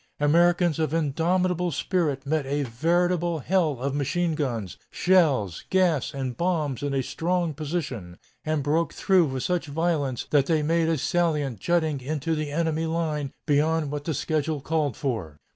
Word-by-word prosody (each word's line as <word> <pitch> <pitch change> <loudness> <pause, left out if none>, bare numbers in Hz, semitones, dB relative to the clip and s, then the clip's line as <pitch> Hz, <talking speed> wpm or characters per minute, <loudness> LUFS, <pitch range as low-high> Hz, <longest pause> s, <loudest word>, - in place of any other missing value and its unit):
Americans 170 +2 +3
of 155 0 0
indomitable 175 +4 +1
spirit 150 -4 -1
met 155 +1 0
a 145 +1 0
veritable 170 +6 +1
hell 155 -2 +1
of 135 +2 -2
machine 165 +4 0
guns, 120 - -3
shells, 145 - +2
gas, 175 -7 +2
and 135 -4 -4
bombs 160 -7 -1
in 145 0 -2
a 135 - +1
strong 165 +4 -1
position, 140 - -4 0.3
and 155 -2 -1
broke 160 +4 +1
through 190 -4 +4
with 130 -3 -3
such 180 -3 -1
violence 145 -4 -1
that 140 -2 +3
they 160 -3 +2
made 165 +1 +2
a 165 - +1
salient 150 - 0
jutting 160 - 0
into 155 +4 -2
the 155 -1 -2
enemy 160 +1 0
line 155 -4 -2
beyond 150 0 +1
what 145 -1 -4
the 160 - -1
schedule 155 +1 -1
called 150 -3 -1
for." 110 - -3
155 Hz, 160 wpm, -25 LUFS, 140-170 Hz, 0.3 s, through